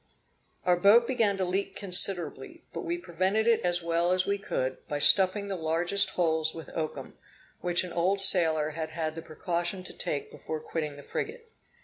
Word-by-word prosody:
Our 180 Hz, -1 st, +3 dB
boat 205 Hz, +6 st, +5 dB
began 230 Hz, -6 st, 0 dB
to 190 Hz, -, -1 dB
leak 190 Hz, +2 st, -3 dB
considerably, 180 Hz, -7 st, +1 dB
but -, -, -5 dB
we 170 Hz, +1 st, -3 dB
prevented 185 Hz, +5 st, -1 dB
it 230 Hz, -1 st, +3 dB
as 175 Hz, -1 st, -1 dB
well 170 Hz, +1 st, 0 dB
as 185 Hz, 0 st, +1 dB
we 200 Hz, 0 st, -1 dB
could, 130 Hz, -9 st, -3 dB
by 145 Hz, -, -3 dB
stuffing 190 Hz, +6 st, +4 dB
the 195 Hz, -, -4 dB
largest 175 Hz, +4 st, +1 dB
holes 160 Hz, -2 st, 0 dB
with 165 Hz, -, -10 dB
oakum, 155 Hz, -2 st, -6 dB, 0.4 s
which 175 Hz, 0 st, +1 dB
an 180 Hz, -, -8 dB
old 185 Hz, +4 st, 0 dB
sailor 160 Hz, -6 st, +5 dB
had 160 Hz, 0 st, -5 dB
had 160 Hz, -1 st, -4 dB
the 165 Hz, -, -8 dB
precaution 175 Hz, +3 st, -4 dB
to -, -, -9 dB
take 145 Hz, -, -3 dB
before 155 Hz, -, -6 dB
quitting 150 Hz, -2 st, -5 dB
the 145 Hz, -, -12 dB
frigate. 460 Hz, -, -6 dB
175 Hz, 185 wpm, -28 LUFS, 160-195 Hz, 0.4 s, boat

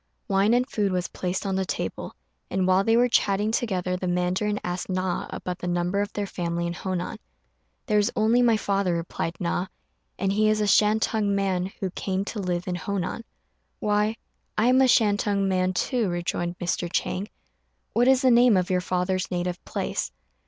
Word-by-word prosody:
Wine 200 Hz, +4 st, +3 dB
and 250 Hz, +1 st, +2 dB
food 205 Hz, -6 st, 0 dB
was 180 Hz, -1 st, -1 dB
placed 185 Hz, +2 st, -3 dB
on 195 Hz, -1 st, -1 dB
the 190 Hz, -, +1 dB
table; -, -, -4 dB, 0.3 s
and 190 Hz, 0 st, 0 dB
while 185 Hz, +1 st, +4 dB
they 225 Hz, +2 st, +3 dB
were 245 Hz, +1 st, +5 dB
chatting 210 Hz, -2 st, +2 dB
together 185 Hz, -6 st, -1 dB
the 185 Hz, 0 st, -3 dB
mandarin 180 Hz, +4 st, 0 dB
asked 180 Hz, +2 st, -3 dB
Na 185 Hz, -1 st, -1 dB
about 180 Hz, 0 st, -5 dB
the 180 Hz, -, -4 dB
number 175 Hz, +3 st, 0 dB
of 205 Hz, 0 st, -3 dB
their 205 Hz, -, -2 dB
family 170 Hz, -2 st, -3 dB
in 170 Hz, -, -2 dB
Honan. 180 Hz, 0 st, -4 dB, 0.7 s
"There 210 Hz, -, +3 dB
is 205 Hz, -, +1 dB
only 225 Hz, +3 st, +3 dB
my 235 Hz, -2 st, +4 dB
father," 195 Hz, -4 st, 0 dB
replied 165 Hz, 0 st, -3 dB
Na, 180 Hz, +1 st, -1 dB, 0.5 s
"and 195 Hz, +1 st, 0 dB
he 215 Hz, +1 st, +3 dB
is 215 Hz, 0 st, +2 dB
a 210 Hz, -, +1 dB
Shantung 210 Hz, 0 st, +3 dB
man 190 Hz, -2 st, 0 dB
who 190 Hz, -2 st, -1 dB
came 190 Hz, +1 st, -2 dB
to 215 Hz, -, -5 dB
live 180 Hz, -2 st, -2 dB
in 180 Hz, -, -1 dB
Honan." 195 Hz, +4 st, -3 dB, 0.6 s
"Why, 210 Hz, +1 st, +1 dB, 0.4 s
I 215 Hz, -, +3 dB
am 255 Hz, +1 st, +5 dB
a 265 Hz, -, +5 dB
Shantung 205 Hz, -4 st, +3 dB
man 185 Hz, -1 st, +1 dB
too," 220 Hz, +4 st, 0 dB
rejoined 175 Hz, 0 st, -2 dB
Mr. 175 Hz, 0 st, -2 dB
Chang; 190 Hz, +2 st, -1 dB, 0.7 s
"what 240 Hz, +3 st, +3 dB
is 265 Hz, 0 st, +4 dB
the 260 Hz, -, +5 dB
name 240 Hz, -3 st, +6 dB
of 180 Hz, 0 st, 0 dB
your 180 Hz, -1 st, +2 dB
father's 185 Hz, +1 st, -1 dB
native 180 Hz, 0 st, -3 dB
place?" -, -, -3 dB
195 Hz, 190 wpm, -25 LUFS, 180-210 Hz, 0.7 s, name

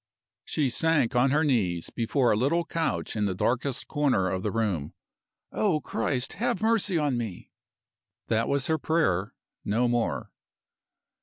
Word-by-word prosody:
She 150 Hz, -3 st, 0 dB
sank 145 Hz, -3 st, +2 dB
on 125 Hz, +2 st, +4 dB
her 150 Hz, +4 st, +2 dB
knees 95 Hz, -, 0 dB
before 120 Hz, +2 st, +1 dB
a -, -, +3 dB
little 150 Hz, +10 st, +1 dB
couch 115 Hz, -, -2 dB
in 105 Hz, -1 st, 0 dB
the 95 Hz, -2 st, -1 dB
darkest 130 Hz, +6 st, -1 dB
corner 135 Hz, -11 st, +1 dB
of 95 Hz, -, -2 dB
the 105 Hz, -, -1 dB
room. 100 Hz, -9 st, -2 dB, 0.6 s
"O 190 Hz, -8 st, +1 dB
Christ, 130 Hz, -3 st, -1 dB
have 240 Hz, +4 st, -1 dB
mercy 220 Hz, -4 st, +2 dB
on 145 Hz, -5 st, +1 dB
me!" 110 Hz, -7 st, -6 dB, 0.7 s
That 115 Hz, 0 st, 0 dB
was 140 Hz, -2 st, 0 dB
her 160 Hz, -1 st, +1 dB
prayer 105 Hz, -, 0 dB, 0.3 s
no 115 Hz, +4 st, +1 dB
more. 120 Hz, -1 st, -1 dB
125 Hz, 150 wpm, -27 LUFS, 105-155 Hz, 0.7 s, on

